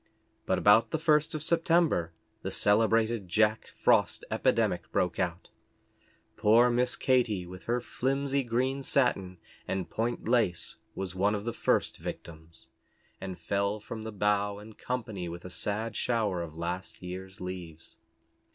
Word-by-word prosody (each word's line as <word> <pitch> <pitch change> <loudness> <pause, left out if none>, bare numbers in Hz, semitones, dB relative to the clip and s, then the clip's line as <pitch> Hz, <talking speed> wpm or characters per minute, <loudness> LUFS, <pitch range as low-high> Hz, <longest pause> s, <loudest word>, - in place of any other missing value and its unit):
But - - +2
about 110 +2 +5
the - - -1
first 155 +1 +2
of 150 - -3
September 165 - +2 0.3
the - - -3
celebrated 110 0 +2
Jack 110 +4 +2
Frost - - +3
epidemic - - +1
broke 90 -2 0
out. 90 -1 -2 0.9
Poor 115 +3 +5
Miss 125 +1 +1
Katy, 120 -8 +1
with 90 +1 -11
her 120 +1 +1
flimsy 135 +3 -1
green 130 +3 -1
satin, 100 -10 +1 0.3
and 95 -2 -3
point 115 0 -2
lace, 115 -8 +1 0.2
was 95 -2 -4
one 100 +3 +1
of 105 +1 -5
the 120 - -2
first - - +1
victims, 80 0 -9 0.6
and 95 -2 -5
fell 100 +1 -1
from 110 +2 -7
the 110 0 -6
bough 105 0 +1
in 105 +2 -11
company 110 -8 -4
with 85 +1 -8
a 90 - -7
sad 105 +4 -3
shower 110 -7 0
of 80 -2 -7
last 90 +3 -5
year's 95 +1 -7
leaves. 90 -3 -8
105 Hz, 145 wpm, -29 LUFS, 90-120 Hz, 0.9 s, about